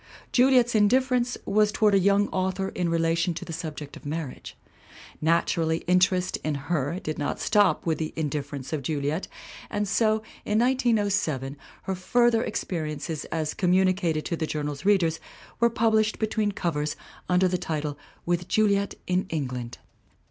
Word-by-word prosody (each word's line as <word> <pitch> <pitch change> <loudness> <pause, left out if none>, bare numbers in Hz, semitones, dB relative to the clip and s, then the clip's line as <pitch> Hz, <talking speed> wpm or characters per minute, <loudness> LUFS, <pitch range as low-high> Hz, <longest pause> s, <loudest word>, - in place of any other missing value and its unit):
Juliet's 250 -1 +4
indifference 245 +3 +2
was 210 0 +3
toward 210 -1 +3
a 195 - +5
young 200 +2 +3
author 190 +1 -1
in 175 -2 -2
relation 165 +1 +1
to - - -6
the 165 - -6
subject 155 -3 -6
of - - -12
marriage. 150 -2 -6 0.6
Naturally 165 0 +1
interest 180 0 +2
in 155 -1 -2
her 150 +3 -2
did 155 -6 -4
not 145 - -2
stop 205 -2 +3
with 160 -3 0
The 155 -1 -2
Indifference 145 -2 -4
of 155 - -1
Juliet 145 +4 -2 0.4
and 205 0 -1
so, 215 +2 +2 0.2
in 210 - 0
1907, 205 - +1 0.3
her 190 - -2
further 235 +5 +2
experiences 155 -2 -3
as 155 -2 -2
communicated 180 -3 +2
to 170 - -1
the 160 -1 -2
Journal's 150 -1 -4
readers 175 -6 +3 0.4
were 235 0 +4
published 220 -1 +2
between 215 -1 0
covers 150 -6 -2 0.3
under 180 +1 +4
the 180 0 -1
title 155 -4 -3 0.3
With 175 0 -1
Juliet 200 -2 +2
in 185 +1 0
England. 125 -6 -4
180 Hz, 150 wpm, -26 LUFS, 155-205 Hz, 0.6 s, a